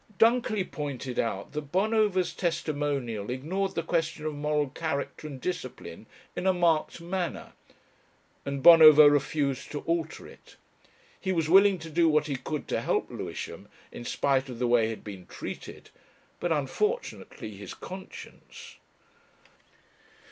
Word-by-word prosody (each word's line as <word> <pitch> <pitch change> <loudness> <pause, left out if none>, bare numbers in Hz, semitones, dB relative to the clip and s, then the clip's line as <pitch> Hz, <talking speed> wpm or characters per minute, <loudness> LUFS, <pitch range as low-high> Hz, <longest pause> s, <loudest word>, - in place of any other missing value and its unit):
Dunkerley 225 -2 +3
pointed 140 -7 -5
out 100 -4 -2
that 150 -1 -6
Bonover's 195 -3 +2
testimonial 145 - -2
ignored 170 +10 -2
the 165 - -1
question 160 -2 -1
of 155 - -2
moral 150 -1 0
character 155 0 -4
and 140 -3 -8
discipline 180 +6 -6 0.3
in 185 - -2
a 190 - +5
marked 170 -2 +1
manner, 175 0 -4 0.9
and 140 -1 -4
Bonover 155 -3 +10
refused 140 -2 -1
to 145 - -4
alter 165 -1 -2
it. - - -16 0.6
He 190 - -2
was 165 -3 0
willing 195 +1 +6
to 165 -1 -9
do 165 +1 +3
what 150 -1 +3
he 145 -2 -2
could 145 +4 -5
to - - 0
help - - -1
Lewisham, - - -6 0.2
in - - -8
spite 135 +2 0
of 125 - -7
the 125 - 0
way 120 -2 +4
he - - -2
had 110 - -6
been 95 -4 -9
treated, - - -8 0.5
but 175 - -2
unfortunately 155 - -2
his 100 -1 -9
conscience.... 190 +1 -11
155 Hz, 140 wpm, -28 LUFS, 135-175 Hz, 0.9 s, Bonover